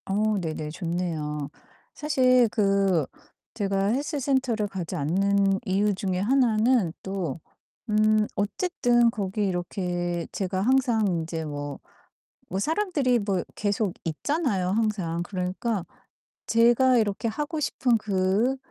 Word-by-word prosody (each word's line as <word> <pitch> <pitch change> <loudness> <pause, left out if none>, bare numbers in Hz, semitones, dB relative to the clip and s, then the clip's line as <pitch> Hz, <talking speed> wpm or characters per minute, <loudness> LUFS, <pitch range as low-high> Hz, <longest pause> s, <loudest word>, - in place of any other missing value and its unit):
어 210 +2 +1
네네. 155 -3 -4
좋네요. 160 -4 -3 0.4
사실 255 -5 +3
그 195 - +2 0.5
제가 195 -2 0
헬스 285 +7 -1
센터를 255 -6 0
가지 190 -4 -5
않는 195 +5 +2
이유 200 +2 +1
중에 185 -1 -2
하나는 230 -3 +3
또 185 -6 -3 0.5
음 215 0 +3
어쨌든 240 - +2
거기 205 -1 -2
이렇게 175 -1 -2
제가 190 -1 -2
항상 245 -1 +2
인제 165 -2 -2
뭐, 145 -2 -5 0.7
뭐 190 - -2
사람들이 305 - +1
뭐 200 -3 -1
계속 205 -2 -1
있잖아요 200 - -1
항상. 195 -5 0
그러니까 185 +3 -2 0.6
제가 240 +3 +4
이렇게 215 0 0
하고 295 +6 -3
싶은 250 -5 +1
그 205 +5 +1
200 Hz, 230 characters per minute, -26 LUFS, 180-235 Hz, 0.7 s, 제가